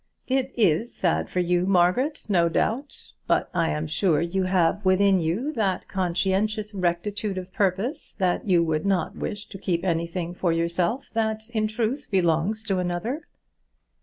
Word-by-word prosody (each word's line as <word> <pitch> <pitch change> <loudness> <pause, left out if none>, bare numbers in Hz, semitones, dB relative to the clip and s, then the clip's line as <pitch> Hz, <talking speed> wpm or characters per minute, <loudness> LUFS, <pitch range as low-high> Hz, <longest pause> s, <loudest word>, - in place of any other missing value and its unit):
"It 265 0 0
is 215 +2 +2
sad 175 -3 0
for 180 - 0
you, 180 +1 +1
Margaret, 195 - +2
no 175 -5 +3
doubt. 245 - -2 0.2
But - - +1
I 170 -2 +1
am 150 +1 -2
sure 160 0 +2
you 180 +3 0
have 185 +2 +2
within 190 0 +4
you 190 - -1
that 200 -7 -1
conscientious 195 +4 0
rectitude 195 +2 -1
of 185 0 -6
purpose 200 - -1
that 185 0 0
you 175 -3 +4
would 155 -1 0
not 195 -2 0
wish 205 -1 -4
to 195 - -9
keep 180 -2 -1
anything 170 0 -1
for 175 -1 0
yourself 170 +9 -1
that 220 -1 -1
in 215 -2 +1
truth 235 +6 -2
belongs 185 +3 +1
to 195 -4 0
another." 180 - -3
190 Hz, 160 wpm, -25 LUFS, 175-215 Hz, 0.2 s, within